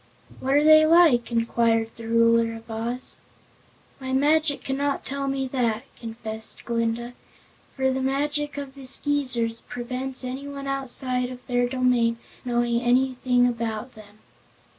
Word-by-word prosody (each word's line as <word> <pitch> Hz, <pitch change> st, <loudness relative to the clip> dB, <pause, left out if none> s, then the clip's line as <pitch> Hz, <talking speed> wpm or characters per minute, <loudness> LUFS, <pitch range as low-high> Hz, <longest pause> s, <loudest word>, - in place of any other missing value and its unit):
"What 265 Hz, +1 st, 0 dB
are 295 Hz, -, +4 dB
they 310 Hz, 0 st, +7 dB
like?" 310 Hz, -8 st, +4 dB
inquired 230 Hz, -1 st, +1 dB
the 230 Hz, -1 st, -9 dB
Ruler 230 Hz, 0 st, +3 dB
of 225 Hz, 0 st, -11 dB
Oz. 235 Hz, +3 st, -4 dB, 0.8 s
"My 260 Hz, -1 st, -4 dB
magic 295 Hz, +2 st, +2 dB
cannot 280 Hz, +1 st, -2 dB
tell 275 Hz, 0 st, -3 dB
me 270 Hz, -1 st, -1 dB
that," 240 Hz, -3 st, -1 dB
confessed 220 Hz, -1 st, -8 dB
Glinda, 235 Hz, +1 st, -2 dB, 0.6 s
"for 265 Hz, -1 st, +1 dB
the 265 Hz, 0 st, -2 dB
magic 290 Hz, +2 st, -1 dB
of 280 Hz, -2 st, -6 dB
the 270 Hz, -1 st, -10 dB
Skeezers 255 Hz, -5 st, +3 dB
prevents 255 Hz, +2 st, -4 dB
anyone 275 Hz, +2 st, -6 dB
outside 260 Hz, -2 st, -1 dB
of 250 Hz, -1 st, -10 dB
their 245 Hz, -1 st, 0 dB
domain 245 Hz, -2 st, +1 dB, 0.3 s
knowing 240 Hz, -1 st, 0 dB
anything 250 Hz, 0 st, +2 dB
about 230 Hz, 0 st, -3 dB
them." 210 Hz, -1 st, -15 dB
250 Hz, 135 wpm, -24 LUFS, 230-275 Hz, 0.8 s, they